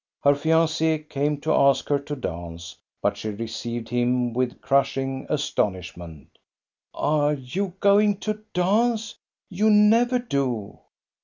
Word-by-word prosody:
Her 140 - +6
fianc^ 160 0 +1
came 145 +1 -1
to 155 - +1
ask 140 -1 +3
her 145 -1 +2
to 145 +1 -6
dance, 85 - -7 0.3
but - - +1
she 110 - -4
re 105 +2 -4
ceived 115 +1 -5
him 120 0 0
with 125 0 -2
crushing 135 -1 0
astonishment 90 - -3 0.3
" - - -62 0.2
Are 150 -1 +2
you 175 +9 -4
going 205 0 +4
to 215 0 -3
dance? 220 +5 +1 0.4
You 210 +4 +2
never 225 +4 +5
do 135 - -3
140 Hz, 135 wpm, -24 LUFS, 120-185 Hz, 0.4 s, Her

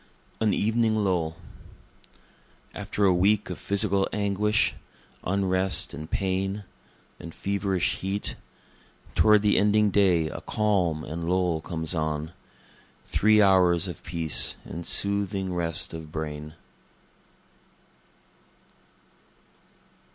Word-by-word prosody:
An 110 -2 +2
Evening 110 +2 +1
Lull 90 -6 0 1.4
After 105 0 -2
a 95 - +5
week 100 +2 +2
of 90 - -6
physical 100 -1 +1
anguish, 105 +1 +1 0.5
Unrest 95 0 +1
and 75 +3 -8
pain, 95 +1 -2 0.6
and 85 - -10
feverish 100 -2 -1
heat, 95 +2 -2 0.8
Toward 105 -1 +4
the 105 - +3
ending 105 0 +3
day 90 -5 +3
a - - -7
calm 95 -7 0
and 85 +2 -5
lull 90 -3 +1
comes 80 0 -3
on, 80 -1 -2 0.7
Three 110 0 +4
hours 90 -2 +4
of 85 -5 -7
peace 80 -2 +2
and 85 +1 -7
soothing 100 -2 0
rest 85 -3 0
of 80 -2 -8
brain. 75 0 -6
95 Hz, 100 wpm, -26 LUFS, 85-100 Hz, 1.4 s, a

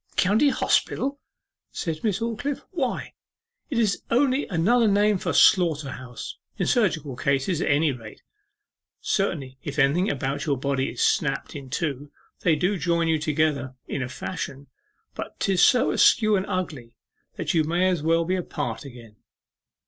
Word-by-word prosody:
'County 215 +10 +3
Hospital!' 275 +1 0 0.5
said 160 -3 -4
Miss 210 -2 0
Aldclyffe; 235 +5 -3
'why, - - -3 0.6
it 265 - -2
is 215 -4 +1
only 260 +3 +2
another 220 +7 +3
name 205 0 +3
for - - -2
slaughter 155 -7 +4
house 125 -2 -8 0.2
in - - 0
surgical 160 - +1
cases 140 +6 0
at - - 0
any 150 +1 +3
rate. 115 -4 -10 0.8
Certainly 140 -10 -2
if 145 +1 -6
anything 150 +7 +3
about 140 +1 -2
your 140 -2 +1
body 135 0 -1
is - - -5
snapt - - 0
in 135 -2 -8
two 145 -1 -3 0.3
they 165 -3 +3
do 180 +5 0
join 170 0 +1
you 160 -1 +2
together 150 -4 0
in 140 - -3
a 130 - -3
fashion, 140 -2 -6 0.5
but - - -8
'tis 190 -3 +2
so 250 -2 +4
askew 215 -2 +4
and 190 -1 -1
ugly, 145 -11 -4 0.4
that - - -2
you 160 -2 +3
may 175 +4 +1
as 180 -4 0
well 165 +2 +2
be 185 +2 0
apart 180 -2 -4
again. 120 -6 -12
160 Hz, 155 wpm, -25 LUFS, 140-195 Hz, 0.8 s, slaughter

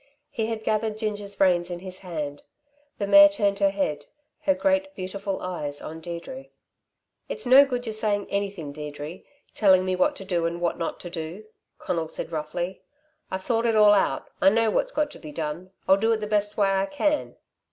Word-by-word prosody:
He 220 -5 -2
had 225 -1 -4
gathered 215 0 0
Ginger's 205 -2 -4
reins 180 -2 +3
in 175 - -4
his 185 0 -7
hand. 150 -6 -5 0.6
The 200 - -1
mare 300 +8 +9
turned 205 -9 0
her 200 -1 +4
head, 155 -7 -2 0.3
her 285 - +2
great 285 0 +1
beautiful 195 +1 -4
eyes 150 -6 -4
on 160 +1 -8
Deirdre. 175 +12 -7 0.8
"It's - - -4
no 265 +3 +8
good 250 -2 -3
you're 220 - -3
saying 210 -2 +1
anything, 200 -7 -3
Deirdre, 150 +3 -7 0.3
telling 190 -3 +4
me 185 0 0
what 185 - +2
to 195 - -9
do 175 -3 0
and 170 +1 -4
what 175 0 -1
not 165 - -3
to 175 - -8
do," 170 +5 -6 0.3
Conal 165 -2 -2
said 160 - -6
roughly. 165 +4 -4 0.5
"I've 190 0 -4
thought 230 +1 +1
it 225 - +2
all 210 -1 +7
out. 200 - +1
I - - +7
know 225 +1 +2
what's - - 0
got 300 -9 0
to - - -11
be 155 - -9
done. 160 +4 -4 0.2
I'll 190 - +6
do 225 +3 +2
it - - +1
the 215 - -3
best 210 0 0
way 200 -2 +3
I 195 0 +1
can." 295 +1 -1
195 Hz, 200 wpm, -25 LUFS, 175-220 Hz, 0.8 s, mare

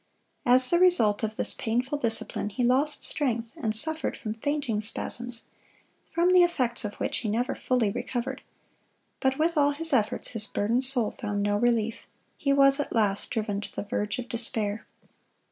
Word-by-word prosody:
(161) 245 - +6
As 255 0 +5
the 345 +1 +4
result 225 - +4
of 220 -1 -3
this - - +2
painful 250 +6 -2
discipline, 225 -3 -2
he 245 +5 -3
lost 265 +5 +1
strength, 235 -6 -1
and 215 -1 -2
suffered 315 +7 -1
from 215 -4 -4
fainting 250 -3 -2
spasms, 235 +2 -3 0.7
from 345 +2 +2
the 365 - +7
effects 255 -10 +1
of 205 -1 -5
which - - -1
he 220 - -3
never 235 +4 0
fully 245 -5 0
recovered. 260 +5 -4 0.8
But 265 0 +1
with 330 +1 +1
all 285 -1 +4
his 320 +1 +1
efforts, 220 -5 0
his 220 -2 -3
burdened 235 +6 +1
soul 250 -5 +3
found 205 -2 -2
no 205 0 +1
relief. 230 0 +1 0.3
He 280 - -1
was 275 0 +5
at 290 - -2
last 205 -3 +1
driven 210 -3 -2
to - - -10
the - - -3
verge 205 0 -2
of 250 -1 -5
despair. 225 -3 -3
240 Hz, 180 wpm, -27 LUFS, 215-275 Hz, 0.8 s, the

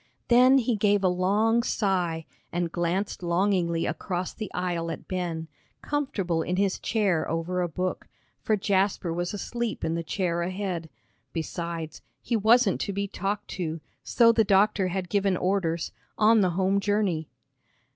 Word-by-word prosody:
Then 250 +2 +7
he 245 -2 +1
gave 205 -1 +2
a - - +5
long 205 +6 +2
sigh 180 -8 0 0.3
and 175 -1 -1
glanced 175 +4 -1
longingly 175 -1 +1
across 175 +3 -3
the 215 -4 -6
aisle 175 -2 -2
at 165 - -6
Ben, 170 -3 -3 0.4
comfortable 210 - -1
in 180 +2 -1
his 195 0 +1
chair 200 -8 0
over 165 +3 -1
a 175 - 0
book, 180 +3 -3 0.3
for 215 - +1
Jasper 190 -3 +1
was 175 +1 -2
asleep 235 +3 -3
in 160 - 0
the 170 - -1
chair 170 0 -1
ahead. 180 -2 -3 0.4
Besides, 165 -1 -4 0.2
he 235 - -2
wasn't 220 -1 +4
to - - -2
be 200 +1 -2
talked 200 +2 -3
to, 165 -3 -3 0.2
so 230 -1 +5
the 225 -1 +3
doctor 200 -1 +3
had 185 0 -3
given 195 -1 +1
orders, 175 -3 0 0.3
on 220 +1 +5
the 185 - +3
home 195 +1 +2
journey. 200 -6 0
185 Hz, 155 wpm, -27 LUFS, 170-205 Hz, 0.4 s, Then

